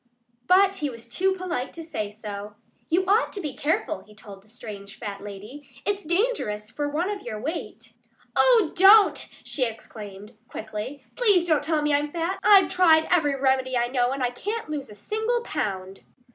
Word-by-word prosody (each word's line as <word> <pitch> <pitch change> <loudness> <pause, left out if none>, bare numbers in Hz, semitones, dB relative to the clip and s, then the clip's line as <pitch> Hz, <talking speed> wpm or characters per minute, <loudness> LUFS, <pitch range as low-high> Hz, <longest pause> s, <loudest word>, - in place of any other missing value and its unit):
But 390 +1 +5
he 295 -4 -1
was 235 -2 -10
too 380 +11 +1
polite 345 -9 -4
to 330 - -8
say 215 -10 -4
so. 210 -1 -8 0.3
"You 360 +3 +2
ought 410 +5 +3
to 410 - -5
be 300 -7 -4
careful," 285 -7 -1
he 210 +1 -19
told 200 -2 -12
the 210 - -25
strange 210 -3 -10
fat 205 -4 -6
lady. 205 +8 -10 0.2
"It's 410 -1 -1
dangerous 330 - -1
for 290 +2 -2
one 335 +7 -1
of 405 - -5
your 215 -3 -6
weight 310 +9 -6 0.2
" - - -32
"Oh, 465 -9 +5
don't!" 395 +3 +6
she 270 - -1
exclaimed 215 -2 -7
quickly. 220 +6 -7
"PLEASE 410 -8 +4
don't 310 -3 +3
tell 305 0 0
me 295 0 +2
I'm 290 +1 +1
fat! 340 +3 -2
I've 395 -2 +6
tried 330 -4 +5
every 295 -6 +2
remedy 260 -1 +1
I 240 0 +1
know 245 -1 +1
and 270 -1 -2
I 245 - +1
can't 415 - -4
lose 285 -3 -4
a 210 - -11
single 440 - -1
pound!" 190 - -4
290 Hz, 185 wpm, -25 LUFS, -, 0.3 s, don't